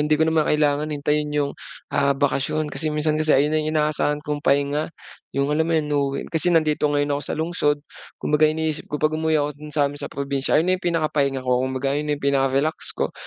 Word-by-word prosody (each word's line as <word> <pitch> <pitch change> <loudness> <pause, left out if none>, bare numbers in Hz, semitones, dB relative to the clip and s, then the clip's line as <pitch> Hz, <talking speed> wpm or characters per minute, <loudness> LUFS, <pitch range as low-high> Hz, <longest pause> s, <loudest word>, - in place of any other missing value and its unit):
hindi 150 +1 +2
ko 160 - +3
naman 160 -1 +2
kailangan 150 0 +2
hintayin 150 0 0
'yong, 145 -1 -1 0.4
ah, 140 0 +2
bakasyon. 145 +2 0
Kasi 155 - -2
minsan 155 0 0
kasi 155 -2 +4
ayun 145 +3 +2
na 155 - +2
yung 155 +1 -1
inaasahan 150 0 0
kong 150 -1 -2
pahinga 145 +2 +1 0.5
'yong 140 +1 +1
alam 160 +2 +1
mo - - +1
'yan, 155 -1 0
'no 140 -1 +2
uwi 140 - -4
kasi 160 +2 +1
nandito 155 -3 +2
ngayon 145 0 +1
ako 140 - -1
sa - - -4
lungsod. 160 -2 +1 0.4
Kumbaga, 150 +1 +2
iniisip 155 -1 -2
ko 150 - -2
'pag 155 +1 +1
umuwi 160 0 +1
ako 145 0 0
do'n 150 - -8
sa 145 - +4
amin 145 +1 -3
sa - - -4
probinsiya, 140 -1 -1
'yon 160 - +3
na 185 - +2
'yong - - -18
pinaka 165 -2 +1
pahinga 135 -2 0
ko. 125 0 +2
Kumbaga, 130 +1 -1
'yon 150 +1 -2
na - - +2
'yong 140 - -9
pinaka 135 0 +2
relax 155 +3 -1
ko. - - -1
150 Hz, 240 wpm, -23 LUFS, 140-155 Hz, 0.5 s, kasi